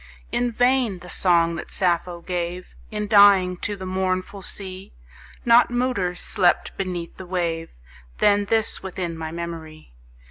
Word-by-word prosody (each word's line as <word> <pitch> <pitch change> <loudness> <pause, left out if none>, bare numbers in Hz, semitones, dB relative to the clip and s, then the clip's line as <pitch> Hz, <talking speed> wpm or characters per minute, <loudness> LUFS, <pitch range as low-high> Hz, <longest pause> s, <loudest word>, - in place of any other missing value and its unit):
In 245 0 0
vain: 245 -3 +2
the 180 0 -12
song 170 -2 +2
that 170 - -7
Sappho 175 -2 0
gave, 175 0 -4 0.2
In 210 -1 -3
dying, 200 -3 +6
to 205 +3 -3
the 190 -1 -8
mournful 185 +1 -2
sea, 190 0 -5 0.5
Not 235 0 +6
muter 240 -8 -1
slept 175 0 +1
beneath 180 -3 -4
the 185 - -9
wave 170 -2 -2 0.5
Than 205 0 +3
this 220 +1 +1
within 180 -3 -4
my 160 -1 -5
memory. 165 - -8
185 Hz, 140 wpm, -23 LUFS, 170-205 Hz, 0.5 s, dying